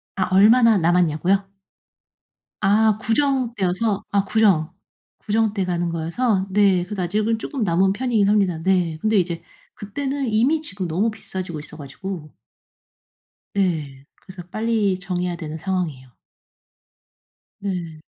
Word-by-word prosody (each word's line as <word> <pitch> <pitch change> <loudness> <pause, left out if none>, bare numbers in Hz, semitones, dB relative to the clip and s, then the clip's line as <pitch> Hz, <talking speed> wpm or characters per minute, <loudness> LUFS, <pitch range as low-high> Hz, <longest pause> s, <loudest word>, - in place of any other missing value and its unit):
아 185 - 0
얼마나 225 +2 +6
남았냐고요? 175 +2 +2 1.1
아 210 +2 +3
구정 255 +2 +1
때여서 195 +2 0
아 200 -1 +1
구정, 195 -7 +2 0.5
구정 220 0 0
때 195 - -1
가는 175 -1 -1
거여서 190 +5 0
네 190 -2 +3
그래서 190 -1 -4
아직은 215 +5 0
쪼끔 255 +2 -4
남은 190 +1 +2
편이긴 225 -4 +1
합니다. 195 -5 +2
네. 180 -4 +1
근데 215 +1 +1
이제 170 -2 -1 0.3
그때는 270 +6 -3
이미 270 +9 +3
지금 200 - -5
너무 200 +8 0
비싸지고 185 -6 -6
있어 150 +1 -11
가지고 155 +2 -7 1.2
네 150 -8 -1
그래서 185 -2 -12
빨리 215 -3 0
정해야 180 -1 -3
되는 160 -2 -6
상황이에요. 160 -8 -3 1.5
네. 175 -5 -4
195 Hz, 275 characters per minute, -22 LUFS, 175-215 Hz, 1.5 s, 얼마나